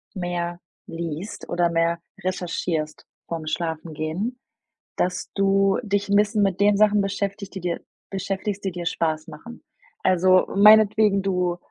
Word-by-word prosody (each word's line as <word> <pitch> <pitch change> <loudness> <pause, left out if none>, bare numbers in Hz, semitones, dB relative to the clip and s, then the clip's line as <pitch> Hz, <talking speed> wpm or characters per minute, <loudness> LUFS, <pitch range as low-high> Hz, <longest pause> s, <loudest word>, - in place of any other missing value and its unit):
mehr 175 -1 -3 0.3
liest 165 +4 -6
oder 175 -1 +2
mehr 170 0 +1 0.2
recherchierst 170 -4 -3 0.2
vorm 160 -2 -5
Schlafengehen, 160 +7 -3 0.6
dass 180 0 -1
du 195 0 +3
dich 200 -2 -1
'n 200 - +3
bisschen 210 0 +3
mit 195 -1 0
den 205 0 +4
Sachen 210 0 +4
beschäftig 200 0 -3
die 190 - -8
dir, 175 -1 -2 0.3
beschäftigst, 195 +1 -3
die 190 - -1
dir 175 -1 -6
Spaß 155 -1 -1
machen. 235 +1 -11 0.4
Also 185 0 +4
meinetwegen 210 0 +6
du, 180 -2 0
185 Hz, 135 wpm, -23 LUFS, 170-200 Hz, 0.6 s, meinetwegen